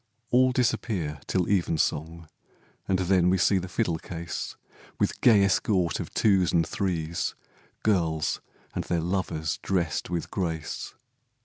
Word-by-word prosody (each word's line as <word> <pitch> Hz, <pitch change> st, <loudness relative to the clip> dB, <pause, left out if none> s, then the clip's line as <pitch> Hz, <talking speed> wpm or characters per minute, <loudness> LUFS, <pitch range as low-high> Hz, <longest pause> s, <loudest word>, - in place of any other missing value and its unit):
All 130 Hz, +1 st, +5 dB
disappear 105 Hz, -, 0 dB
till 90 Hz, -2 st, +1 dB
evensong, 80 Hz, -3 st, 0 dB, 0.6 s
And 95 Hz, -, +2 dB
then 90 Hz, -1 st, +3 dB
we 95 Hz, -, +3 dB
see 95 Hz, +2 st, +3 dB
the 90 Hz, -, -5 dB
fiddle 90 Hz, -6 st, 0 dB
case, 85 Hz, -1 st, -5 dB, 0.4 s
With -, -, 0 dB
gay 105 Hz, -5 st, +6 dB
escort 95 Hz, -3 st, +2 dB
of -, -, -5 dB
twos 95 Hz, -5 st, +3 dB
and 85 Hz, -1 st, +3 dB
threes, 85 Hz, -5 st, -2 dB, 0.5 s
Girls 85 Hz, -7 st, +1 dB, 0.3 s
and -, -, -2 dB
their 85 Hz, -, 0 dB
lovers 85 Hz, -3 st, -2 dB
drest 90 Hz, -5 st, -1 dB
with 85 Hz, -1 st, -3 dB
grace. 80 Hz, -4 st, -3 dB
90 Hz, 130 wpm, -27 LUFS, 80-100 Hz, 0.6 s, gay